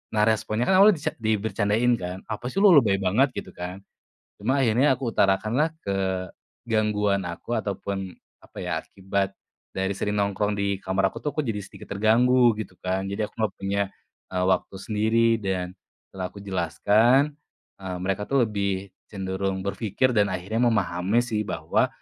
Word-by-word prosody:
Nah, 105 - +4
responnya 110 +1 +1
kan 185 +8 +4
awalnya 205 0 +7
dica 150 - -2
dibecandain 110 +1 +1
kan. 90 0 -5
"Apa 110 +3 -4
sih 195 +10 0
lu, 205 - +8
lebay 120 - +6
banget," 125 +8 +2
gitu - - -6
kan. 90 +2 -7 0.6
Cuma 130 +7 +1
akhirnya 130 +4 +3
aku 120 -3 -3
utarakanlah 110 +10 +2 0.8
kegangguan 105 -4 0
aku, 90 +7 -3
ataupun 100 -2 -4 0.3
apa - - -18
ya, - - -4
akibat 95 0 -2 0.4
dari 95 +1 -1
sering 105 +1 -1
nongkrong 100 +1 0
di 100 -1 -1
kamar 95 +1 +1
aku - - -11
tuh 150 - -1
aku 155 - 0
jadi 115 -7 -2
sedikit 100 - -9
terganggu 120 +3 +5
gitu 95 -4 -6
kan. 95 +1 -1
Jadi 100 +2 -2
aku - - -14
nggak 110 - 0
punya, 100 +1 -1 0.5
eee, 90 0 0
waktu 95 +1 0
sendiri. 110 +3 +2
Dan 90 -2 -2 0.4
setelah 95 -1 -4
aku 100 - -12
jelaskan, 105 - +3 0.5
eee, 95 -1 -4
mereka 95 +2 -2
tuh 135 -2 +4
lebih 100 -2 -2 0.2
cenderung 95 -1 -3
berpikir 105 +5 0
dan 105 -3 +3
akhirnya 95 +5 -3
memahami 100 +1 +1
sih 110 -3 -1
bahwa, - - +1
105 Hz, 160 wpm, -25 LUFS, 95-115 Hz, 0.8 s, lu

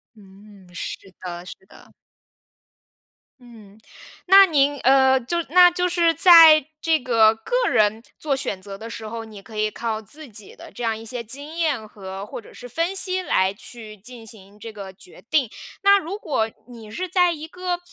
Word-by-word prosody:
嗯， 200 -1 -18
是 175 - -6 0.2
的 175 -1 -7
是 - - -9
的。 - - -19 1.5
嗯， 220 -4 -16 0.5
那 390 +1 +8
您， 290 -3 +1
呃， 265 0 +4
就 260 +7 -3
那 355 +2 +6
就 360 0 -1
是 340 -2 +2
在 325 -3 +8
这 325 -1 +1
个 225 -3 +3
个 - - -1
人 215 -1 +1
做 290 -3 -1
选 200 -7 -4
择 195 0 -8
的 225 +3 -9
时 220 -1 -8
候， 225 +1 -6
你 215 -3 -12
可 220 +2 -14
以 215 0 -1
靠 220 -1 -4
自 290 +8 -8
己 215 -3 -8
的 - - -12
这 245 - -8
样 225 -1 -1
一 225 - -11
些 235 +1 -4
经 285 +7 -7
验 300 -10 -1
和 195 -1 -9
或 210 - -8
者 - - -17
是 245 - -11
分 335 - -2
析 375 -1 -1
来 190 - +1
去 220 0 -12
进 225 +2 -11
行 205 -1 -10
这 225 0 -9
个 200 -2 -9
决 185 -1 -17
定。 275 -7 +1 0.3
那 400 0 +6
如 390 +2 -6
果， 225 - -2 0.2
你 230 -3 -12
是 370 +11 -4
在 355 0 +2
一 315 -1 -7
个 360 +1 -4
235 Hz, 200 characters per minute, -22 LUFS, 215-320 Hz, 1.5 s, 那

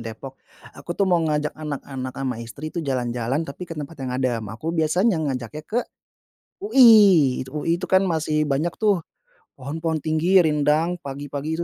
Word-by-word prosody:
Depok, 115 +4 -9 0.3
aku 170 +5 -7
tuh 200 - +2
mau 175 -3 +2
ngajak 150 -1 -1
anak-anak 135 -4 -6
sama 130 -3 -3
istri 140 +7 -8
itu 170 - -3
jalan-jalan, 125 +1 -2
tapi 160 +5 -8
ke 165 - -7
tempat 150 +2 -6
yang 130 - -4
adem. 125 -4 -1
Aku 155 +10 -5
biasanya 170 +4 +1
ngajaknya 130 -1 -4
ke 230 - 0 0.8
UI. 210 - +6
UI 165 +4 -1
itu - - -5
kan 190 +1 +4
masih 155 -3 0
banyak 145 +4 -1
tuh 205 -4 +2 0.6
pohon-pohon 155 +3 -3
tinggi, 170 +4 +3
rindang, 155 +3 +1
pagi-pagi 145 +3 -5
155 Hz, 155 wpm, -23 LUFS, 135-170 Hz, 0.8 s, UI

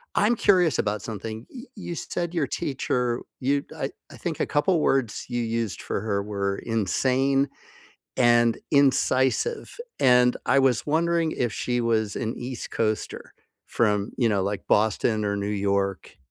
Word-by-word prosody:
I'm 215 +4 +3
curious 180 - +3
about 105 -1 -1
something. 110 +1 -6
Y 245 - -7
you 180 -5 -6
said 170 +1 -4
your 160 -6 0
teacher 125 -2 -1 0.2
you 140 +2 0
I - - -2 0.2
I - - -11
think - - -4
a - - +1
couple 165 +4 +2
words 130 -7 0
you 120 - -1
used 115 -2 -2
for - - -3
her 100 -2 -1
were 100 -1 -2
insane, 130 +6 +1 0.7
and 120 -1 +4
incisive. 140 - +2 0.2
And 125 -1 +5
I 140 - +4
was 130 -3 +2
wondering 165 +1 +1
if 120 -3 -1
she 120 +4 -1
was 110 -3 0
an 115 -1 -2
East 125 0 -6
Coaster 110 -1 -2 0.3
from, 105 -2 +1
you 120 - +3
know, 100 -3 +1
like, 100 +1 -3
Boston 110 +1 +2
or 100 0 0
New 100 0 -2
York. 100 -2 -1
120 Hz, 155 wpm, -25 LUFS, 105-140 Hz, 0.7 s, And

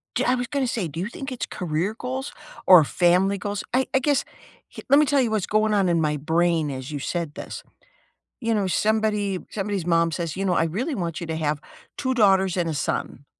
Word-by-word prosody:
D - - +1
I 250 - +3
was 245 -1 -2
gonna 275 +1 -1
say, 220 -7 -2
do 160 +3 -6
you 190 - -2
think 270 +3 -7
it's 250 - -4
career 175 +4 -2
goals 260 +2 -4 0.3
or 180 -4 +9
family 180 +5 +2
goals? 205 +1 -4
I 260 +1 +3
I - - +6
guess 285 0 +1 0.5
h - - -6
let 280 - +7
me 300 - +5
tell 285 -1 +3
you 240 -3 +1
what's 215 -4 0
going 215 0 +2
on 195 -3 +2
in 170 -1 +2
my 150 -1 +1
brain 160 +1 +1
as 130 0 -6
you 150 - -4
said 165 +1 -3
this: - - -7 0.8
You 230 -1 0
know, 205 -3 +1
somebody 210 0 +1
somebody's 200 -3 -3
mom 165 -1 +2
says, 170 -1 -3
"You 195 +1 -2
know, 185 - +2
I 165 - +2
really 235 - -2
want 170 -3 -3
you 170 - -5
to 160 - -3
have 150 -2 -1 0.4
2 260 0 0
daughters 195 -5 +3
and 170 -2 0
a - - -2
son." 145 - -3
190 Hz, 230 wpm, -24 LUFS, 165-220 Hz, 0.8 s, or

